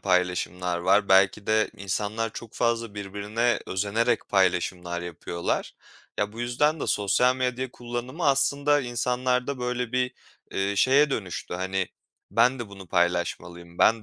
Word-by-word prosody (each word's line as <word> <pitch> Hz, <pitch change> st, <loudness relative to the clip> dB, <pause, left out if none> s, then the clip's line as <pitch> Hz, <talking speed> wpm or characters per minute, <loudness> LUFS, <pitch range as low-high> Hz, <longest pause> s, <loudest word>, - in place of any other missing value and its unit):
paylaşımlar 90 Hz, -1 st, 0 dB
var. 95 Hz, +3 st, +3 dB
Belki 95 Hz, +2 st, +4 dB
de 110 Hz, 0 st, +2 dB
insanlar 105 Hz, +3 st, -2 dB
çok 115 Hz, -1 st, -9 dB
fazla 115 Hz, -3 st, 0 dB
birbirine 105 Hz, +4 st, -1 dB
özenerek 110 Hz, +5 st, 0 dB
paylaşımlar 90 Hz, -2 st, +1 dB
yapıyorlar. 85 Hz, 0 st, -3 dB, 0.5 s
Ya, 105 Hz, 0 st, 0 dB
bu 115 Hz, -, -8 dB
yüzden 145 Hz, +6 st, +1 dB
de -, -, -2 dB
sosyal 125 Hz, +6 st, +2 dB
medya 130 Hz, 0 st, -1 dB
kullanımı 125 Hz, +7 st, -4 dB
aslında 140 Hz, +1 st, +3 dB
insanlarda 125 Hz, +2 st, -1 dB
böyle 125 Hz, -1 st, -2 dB
bir, 125 Hz, 0 st, +1 dB, 0.4 s
eee, 100 Hz, +1 st, -1 dB
şeye 135 Hz, +8 st, +5 dB
dönüştü, 95 Hz, -8 st, -4 dB
hani, 95 Hz, 0 st, -1 dB, 0.4 s
ben 130 Hz, +2 st, +3 dB
de 120 Hz, -3 st, -5 dB
bunu 100 Hz, -1 st, -11 dB
paylaşmalıyım, 85 Hz, 0 st, -1 dB
ben 115 Hz, -1 st, +4 dB
110 Hz, 135 wpm, -26 LUFS, 95-125 Hz, 0.5 s, şeye